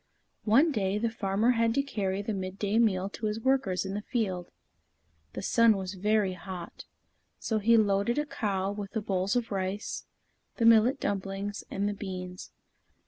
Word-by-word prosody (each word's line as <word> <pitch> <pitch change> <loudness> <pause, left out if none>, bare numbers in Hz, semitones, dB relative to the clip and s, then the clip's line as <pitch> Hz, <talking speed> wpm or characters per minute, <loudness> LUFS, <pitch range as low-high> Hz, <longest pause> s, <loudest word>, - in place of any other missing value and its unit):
One 270 +10 +5
day, 200 -5 0
the 225 +1 0
farmer 220 +1 +1
had 230 -1 +2
to 275 - +2
carry 200 -7 -2
the 220 - -2
midday 195 +3 -1
meal 195 -5 +2
to 215 +1 -4
his 210 +1 -2
workers 225 -8 +1
in 190 - -4
the 205 - -3
field. 195 -7 -2 0.8
The - - -5
sun 230 -3 +4
was 190 0 -4
very 205 0 +1
hot, 180 -2 -8 0.5
so 220 -2 -1
he 230 +2 +5
loaded 205 +2 +2
a 295 - +1
cow 195 -8 -2
with 205 -1 -6
the 220 - -1
bowls 195 0 0
of 240 -2 -1
rice, 195 +2 -3 0.5
the 230 - 0
millet 230 +4 +6
dumplings, 195 +1 -3
and 200 +1 -1
the 205 - -1
beans. 185 -2 -7
205 Hz, 170 wpm, -29 LUFS, 190-225 Hz, 0.8 s, millet